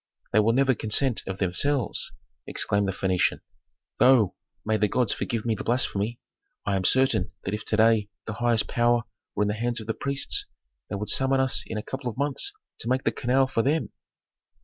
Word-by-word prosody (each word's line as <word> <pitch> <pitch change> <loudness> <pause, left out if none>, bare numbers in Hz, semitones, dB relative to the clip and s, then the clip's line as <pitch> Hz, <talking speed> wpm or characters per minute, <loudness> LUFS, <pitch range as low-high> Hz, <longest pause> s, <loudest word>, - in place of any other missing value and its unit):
"They 110 - +5
will 110 +2 +3
never 135 +1 +3
consent 115 +2 +1
of 95 0 -4
themselves!" 110 +8 0 0.4
exclaimed 100 -1 +1
the - - 0
Phœnician. 95 -1 0 0.6
"Though 125 -7 +5 0.3
may 110 0 +1
the 105 - +2
gods 120 +2 +1
forgive 115 -1 -3
me 115 - +1
the 105 - -5
blasphemy 120 -2 0 0.5
I 100 - +1
am 95 -1 -1
certain 130 -8 +3
that 95 - -3
if 105 0 -3
to 105 - 0
day 110 -2 +4 0.2
the 110 - -4
highest 120 -1 +1
power 120 0 +2 0.3
were 105 - +2
in - - 0
the 105 - 0
hands 120 +2 -1
of 110 - -8
the 115 - -1
priests 140 +3 -1 0.4
they - - -3
would 105 +1 -2
summon 135 0 +2
us 130 -5 +2
in - - -4
a 105 - -4
couple 135 -2 -4
of 120 - -9
months 145 - -1 0.3
to 115 - -2
make 130 +1 +1
the - - +2
canal 130 +1 +2
for 130 -3 0
them." 150 +6 0
115 Hz, 200 wpm, -26 LUFS, 105-130 Hz, 0.6 s, They